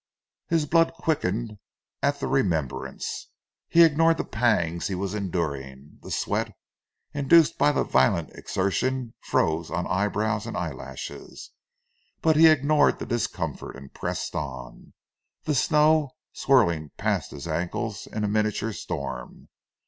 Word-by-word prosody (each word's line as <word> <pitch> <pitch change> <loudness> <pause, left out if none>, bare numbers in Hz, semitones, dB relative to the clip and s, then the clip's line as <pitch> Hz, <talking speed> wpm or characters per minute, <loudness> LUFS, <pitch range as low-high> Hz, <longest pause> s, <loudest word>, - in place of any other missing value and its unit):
His 165 -2 +1
blood 165 +2 +3
quickened 115 - -2 0.4
at 140 0 +1
the - - -2
remembrance. 85 - -2 0.4
He 170 - +7
ignored 165 +1 +4
the - - -1
pangs 105 -8 0
he 95 - -3
was 95 +1 -3
enduring. 75 -8 -4
The - - -10
sweat, - - -2 0.6
induced 155 +3 +4
by 145 - +5
the 145 - +1
violent 65 0 +2
exertion 120 +6 -1
froze 80 +1 0
on 90 -1 -2
eyebrows 105 +2 0
and - - -4
eyelashes, - - -7 0.7
but 160 -1 +3
he 160 +2 +8
ignored 150 -1 +4
the - - -6
discomfort, 120 0 -3
and 70 0 -12
pressed - - -4
on, 65 -5 -7 0.5
the 150 - 0
snow 150 +1 +3 0.2
swirling 85 - +2
past - - -1
his 75 +3 -8
ankles 90 +6 -3
in 105 - -4
a - - +1
miniature 110 +1 0
storm. 65 -8 -6
105 Hz, 130 wpm, -25 LUFS, -, 0.7 s, he